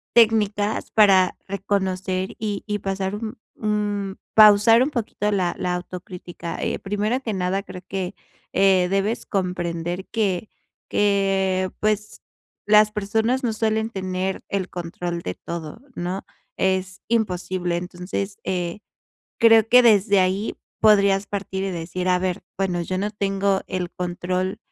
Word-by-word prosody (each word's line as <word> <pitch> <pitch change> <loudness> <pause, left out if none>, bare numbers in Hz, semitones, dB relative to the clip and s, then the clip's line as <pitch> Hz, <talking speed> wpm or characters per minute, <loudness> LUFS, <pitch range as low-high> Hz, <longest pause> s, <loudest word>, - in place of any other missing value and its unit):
técnicas 215 -2 +3
para 195 -4 +5
reconocer, 190 -1 -2
y 210 -2 -3
y 210 -1 -2
pasar 195 0 -2
un 215 +1 -6 0.2
un 205 -2 -2 0.2
pausar 215 +2 +7
un 275 - 0
poquito 215 -6 -2
la 185 -4 0
la 180 0 0
autocrítica. 180 -1 -7
Eh, - - -1
primero 210 +5 -1
que 225 -5 -3
nada, 190 +1 0
creo 180 -2 -10
que, 190 0 -4 0.4
eh, 190 -2 +4
debes 195 +4 -1
comprender 175 -1 -2
que 210 -2 -1 0.4
que 195 -2 +1
pues, 215 0 -1 0.4
las 210 0 +6
personas 220 +5 0
no 235 - +1
suelen 220 0 0
tener 190 -2 -3
el 190 -2 -2
control 175 0 -4
de 90 - -4
todo, 170 +2 -7 0.2
¿no? 180 +3 -3 0.3
Es 190 0 -1
imposible. 185 -5 -1
Entonces, 180 +3 -4
eh, 175 0 -2 0.6
creo 225 -1 +6
que 250 +2 +7
desde 205 -4 +5
ahí 190 +3 0 0.3
podrías 200 -2 +4
partir, 195 -1 -3
y 195 - -2
decir: 180 +1 -3
"A 180 0 +4
ver, 180 -1 -2 0.2
bueno, 180 -3 0
yo 185 +2 -3
no 205 +2 -1
tengo 195 -1 0
el 180 -2 -3
control, 180 +1 -2
195 Hz, 135 wpm, -23 LUFS, 185-210 Hz, 0.6 s, pausar